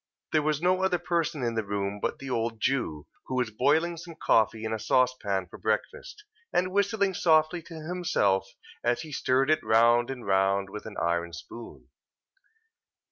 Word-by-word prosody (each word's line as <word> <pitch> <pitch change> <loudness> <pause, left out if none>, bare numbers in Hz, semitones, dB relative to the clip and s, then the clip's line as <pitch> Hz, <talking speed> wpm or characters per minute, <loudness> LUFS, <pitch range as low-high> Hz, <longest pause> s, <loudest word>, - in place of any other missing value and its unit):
There 155 - +3
was 155 +1 -1
no 185 +1 +3
other 190 -1 +2
person 170 -4 -1
in 120 -1 0
the 110 -1 -1
room 100 0 -3
but - - -2
the 135 -1 -7
old 115 -1 -1
Jew, 105 - -1 0.2
who 130 - -3
was 125 -3 0
boiling 160 +9 +2
some 165 0 -9
coffee 110 -6 +2
in 110 - -2
a 110 - -2
saucepan 110 -7 +1
for 90 - -13
breakfast, 265 - -3 0.3
and 185 +1 +1
whistling 200 0 +1
softly 160 0 +3
to 165 +1 -12
himself 170 - +1 0.3
as 120 0 +1
he 155 - -9
stirred 135 +1 +1
it 155 - +3
round 120 +2 +4
and 130 -3 -6
round, 95 0 +1
with 105 - -7
an 110 - -9
iron 85 0 -1
spoon. 115 +8 -10
125 Hz, 175 wpm, -28 LUFS, 105-165 Hz, 0.3 s, round